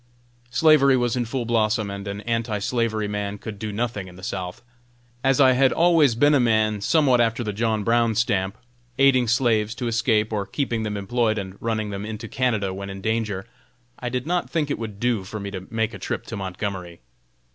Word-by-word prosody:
Slavery 140 +1 +5
was 120 -1 0
in 125 -1 0
full 120 +1 -3
blossom, 110 -2 +1
and 100 0 -6
an 100 +1 -4
anti 115 -1 -1
slavery 110 0 -1
man 105 0 -3
could 105 0 -8
do 110 0 -4
nothing 105 -2 -3
in 90 - -12
the 95 - -13
South. 95 +2 -5 0.6
As 135 -1 +3
I 130 -2 +7
had 130 0 +4
always 165 -7 +4
been 145 +5 +4
a 145 - +5
man 110 -3 +2
somewhat 130 +1 +3
after 115 0 +1
the 105 -2 -3
John 110 0 0
Brown 115 0 +2
stamp, 100 -3 0 0.4
aiding 135 -3 +4
slaves 110 -2 +2
to 125 - -3
escape, 110 -1 +1
or 100 -2 -2
keeping 120 -6 -2
them 105 -1 -3
employed, 110 +2 0
and 95 -2 -5
running 110 -2 -2
them 100 0 -5
into 110 +1 -6
Canada 110 -6 0
when 100 +1 -6
in 95 0 -7
danger, 110 -3 -1 0.5
I 125 - -3
did 125 0 -3
not 175 +2 -1
think 150 -4 -1
it - - -2
would 105 -3 -6
do 120 -4 0
for 105 +3 -6
me 100 0 -5
to 95 -1 -7
make 115 0 -1
a - - -8
trip - - -4
to 115 - -6
Montgomery. 95 - -5
110 Hz, 205 wpm, -23 LUFS, 100-120 Hz, 0.6 s, I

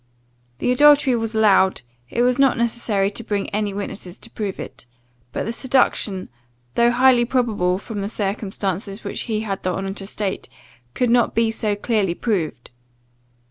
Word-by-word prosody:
The 245 - 0
adultery 290 0 +5
was 225 -1 -1
allowed, 195 - +4 0.3
it 240 - +1
was 250 +1 +2
not 270 -2 +4
necessary 225 -4 0
to 230 - -7
bring 205 -2 -2
any 210 0 -1
witnesses 195 -2 -6
to 230 - -13
prove 205 -3 -4
it; - - -9 0.4
but - - -3
the 230 - -3
seduction, 235 -7 +1 0.5
though 235 0 +4
highly 245 0 +5
probable 225 -8 +1
from 205 +1 -6
the 200 - -3
circumstances 200 -1 -3
which - - -4
he 215 -1 0
had 200 -3 -3
the 185 - -1
honour 195 +1 -3
to 195 -1 -7
state, 200 -2 -4 0.5
could 245 -2 +1
not 240 -1 +3
be 225 0 +2
so 215 -2 -1
clearly 205 -4 0
proved. 170 - -2
215 Hz, 165 wpm, -21 LUFS, 195-235 Hz, 0.5 s, adultery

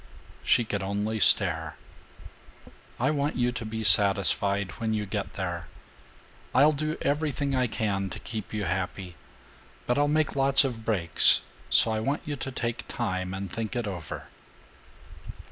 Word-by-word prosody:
She 120 - +3
could 100 -2 -3
only 105 +3 -2
stare. 80 -7 +3 1.2
"I 130 +4 +1
want 145 0 -1
you 125 0 0
to 120 - -6
be 110 0 -5
satisfied 100 0 +4
when 110 -1 -1
you 105 -1 -2
get 95 - -4
there. - - -4 0.9
I'll 145 +4 +6
do 155 +2 -3
everything 145 -1 -1
I 130 -1 +1
can 100 -4 -2
to - - -7
keep 110 -3 -7
you 105 -1 -3
happy, 95 -1 -4 0.7
but 125 +3 0
I'll 145 - +3
make 155 0 0
lots 135 0 +4
of 120 -5 -4
breaks, 90 -9 +5 0.3
so 115 - +4
I 110 - -1
want 140 +6 -2
you 145 - -4
to 135 0 -5
take 120 -1 -4
time 95 -6 -3
and 95 -2 -6
think 115 +2 -4
it 120 -2 -2
over." 90 -6 -7
110 Hz, 155 wpm, -26 LUFS, 100-135 Hz, 1.2 s, I'll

